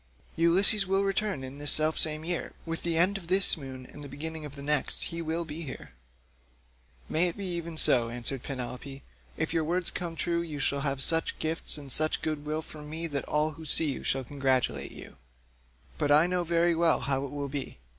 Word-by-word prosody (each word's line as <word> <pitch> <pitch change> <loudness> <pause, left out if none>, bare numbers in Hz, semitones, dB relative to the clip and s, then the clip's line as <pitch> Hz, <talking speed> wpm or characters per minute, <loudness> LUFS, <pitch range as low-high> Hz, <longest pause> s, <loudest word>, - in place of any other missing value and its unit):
Ulysses 190 +5 +5
will 195 +1 +2
return 195 -6 -1
in 130 +2 -8
this 145 0 +2
self 155 +2 +4
same 155 0 0
year; 175 -1 -2
with 165 0 -3
the 170 -1 0
end 190 +4 +4
of 170 - -13
this 190 +2 +4
moon 130 -4 -8
and 145 +3 -11
the 140 - -8
beginning 155 +2 -6
of 145 -1 -9
the 140 - -8
next 150 -1 +1
he 170 0 -4
will 165 +1 -2
be 155 +1 -6
here." 135 - -7 1.2
"May 170 +3 +2
it 170 - -4
be 200 - -4
even 170 -2 -4
so," 120 -6 +4
answered 120 +2 -2
Penelope; 135 +1 -6 0.3
"if 155 +1 -1
your 165 -1 +2
words 175 +3 +1
come 170 -2 -4
true 170 +1 0
you 160 -3 -5
shall 140 0 0
have 135 -1 +1
such 165 0 +1
gifts 160 0 +1
and 140 -2 -7
such 155 +3 +2
good 150 -1 -3
will 155 +1 -1
from 150 -1 -10
me 160 +2 -3
that 145 -4 -3
all 150 +1 +1
who 160 +1 -11
see 155 0 +1
you - - -6
shall 135 0 +1
congratulate 130 -1 0
you; - - -11 0.8
but 145 -1 +1
I 150 +3 +7
know 180 0 0
very 170 0 +3
well 165 0 +3
how 135 +1 0
it 140 - -4
will 145 -1 -3
be. 140 - -5
155 Hz, 215 wpm, -29 LUFS, 140-170 Hz, 1.2 s, I